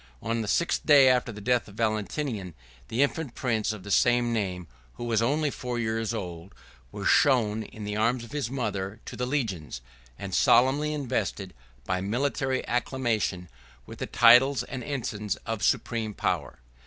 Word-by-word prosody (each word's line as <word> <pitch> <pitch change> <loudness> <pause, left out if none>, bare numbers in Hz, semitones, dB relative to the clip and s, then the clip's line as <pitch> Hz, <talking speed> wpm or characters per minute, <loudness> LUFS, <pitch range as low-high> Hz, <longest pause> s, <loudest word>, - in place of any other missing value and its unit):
On 115 0 -2
the 110 - -4
sixth 170 +10 +1
day 140 -3 +7
after 125 -2 +2
the 105 - -9
death 120 +2 +1
of 100 - -13
Valentinian, 110 - -2 0.3
the 120 +5 +2
infant 145 -2 -2
prince 115 -4 0
of 105 -3 -8
the 100 - -7
same 120 0 +3
name, 95 -5 -2 0.3
who - - -7
was 115 -2 +1
only 145 +5 +1
four 125 -2 -4
years 115 -1 -1
old, 90 -5 -6 0.4
was - - -4
shown, 110 -6 +3
in 110 0 -9
the 105 0 -3
arms 115 +3 +1
of 120 - -12
his 145 -5 -2
mother, 105 -5 -3
to - - -7
the 125 - -2
legions; 95 - -3 0.4
and - - -7
solemnly 140 +5 +4
invested, 115 -9 -3 0.3
by 90 0 -1
military 130 +5 -1
acclamation, 115 -7 -1 0.4
with - - -11
the - - -3
titles 130 +3 +6
and 130 -1 -6
ensigns 110 -6 -3
of 115 -2 -3
supreme 110 0 0
power. - - -2
115 Hz, 165 wpm, -27 LUFS, 105-130 Hz, 0.4 s, day